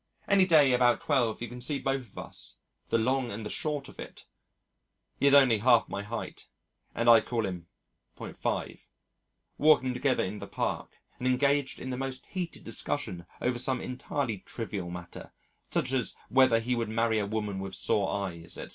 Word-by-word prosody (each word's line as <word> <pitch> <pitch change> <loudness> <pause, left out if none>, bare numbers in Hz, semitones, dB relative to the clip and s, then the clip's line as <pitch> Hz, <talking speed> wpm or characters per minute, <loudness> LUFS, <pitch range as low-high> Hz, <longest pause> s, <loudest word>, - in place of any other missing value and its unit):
Any 195 -2 +5
day 150 -6 +6
about 125 -1 +4
twelve 120 -6 +1
you - - -3
can 125 +2 -9
see 140 +4 0
both 135 0 -1
of - - -23
us, - - -5 0.3
"the - - +3
long 130 +2 +1
and 110 0 -6
the 105 - -4
short 145 -2 -2
of - - -14
it" - - -9 0.9
(he 140 - +4
is 140 - +6
only 130 -6 +6
half 120 +1 +5
my 100 - -3
height 110 +3 -6 0.5
and 115 - 0
I 115 -1 +8
call 115 0 -2
him 90 -3 -5 0.5
.5), - - -4 0.7
walking 135 -4 +5
together 130 +1 +1
in 100 +3 -4
the - - -7
Park, - - -3 0.2
and 125 - -1
engaged 140 +2 +2
in 130 - -5
the 125 - -3
most 135 0 -5
heated 180 -3 -5
discussion 85 -1 -4
over 120 0 0
some 130 0 0
entirely 125 -3 -3
trivial 100 -4 -5
matter, 90 0 -9 0.4
such 125 - 0
as 130 -4 -1
whether 130 -3 +5
he 125 +2 -1
would 115 -2 -2
marry 115 0 +1
a 100 - -1
woman 105 -2 -2
with 95 -1 -5
sore 100 +1 +1 0.2
eyes, 85 -2 -4
etc. - - -7
120 Hz, 180 wpm, -29 LUFS, 105-135 Hz, 0.9 s, I